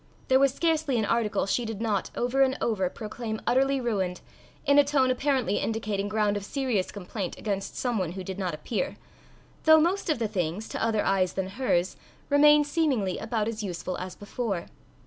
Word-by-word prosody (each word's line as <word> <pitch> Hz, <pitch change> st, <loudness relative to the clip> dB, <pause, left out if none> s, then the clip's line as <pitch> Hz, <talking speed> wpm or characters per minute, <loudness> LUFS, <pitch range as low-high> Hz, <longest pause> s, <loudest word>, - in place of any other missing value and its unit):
There 260 Hz, 0 st, +6 dB
was 275 Hz, -1 st, +4 dB
scarcely 315 Hz, -3 st, +1 dB
an 220 Hz, -, +1 dB
article 230 Hz, -1 st, +1 dB
she 220 Hz, +5 st, 0 dB
did 225 Hz, -3 st, -5 dB
not, 215 Hz, -3 st, -1 dB
over 245 Hz, +3 st, +1 dB
and 265 Hz, 0 st, +3 dB
over, 190 Hz, -6 st, 0 dB
proclaim 220 Hz, +1 st, -5 dB
utterly 270 Hz, +2 st, +2 dB
ruined, 195 Hz, -7 st, -1 dB, 0.4 s
in 285 Hz, 0 st, +5 dB
a -, -, +7 dB
tone 275 Hz, -2 st, +2 dB
apparently 260 Hz, -3 st, +1 dB
indicating 210 Hz, -3 st, -2 dB
ground 210 Hz, -1 st, +1 dB
of 200 Hz, -, -5 dB
serious 245 Hz, -5 st, -1 dB
complaint 195 Hz, -1 st, -5 dB
against 195 Hz, -2 st, -3 dB
some 245 Hz, -4 st, 0 dB
one 175 Hz, -3 st, -2 dB
who 190 Hz, 0 st, -6 dB
did 190 Hz, +1 st, -6 dB
not 180 Hz, -5 st, -2 dB
appear, 180 Hz, +6 st, -3 dB, 0.7 s
though 315 Hz, 0 st, +8 dB
most 350 Hz, +4 st, +1 dB
of 310 Hz, -, +2 dB
the 230 Hz, -2 st, -1 dB
things, 190 Hz, 0 st, -2 dB
to -, -, -3 dB
other 225 Hz, -2 st, +1 dB
eyes 190 Hz, -2 st, +2 dB
than 190 Hz, -1 st, -2 dB
hers, 190 Hz, -5 st, 0 dB, 0.3 s
remained 295 Hz, +1 st, +6 dB
seemingly 285 Hz, -, 0 dB
about 220 Hz, -1 st, -1 dB
as 225 Hz, -1 st, -3 dB
useful 185 Hz, -2 st, -4 dB
as 185 Hz, 0 st, -6 dB
before. 205 Hz, -3 st, -4 dB
220 Hz, 185 wpm, -27 LUFS, 195-265 Hz, 0.7 s, though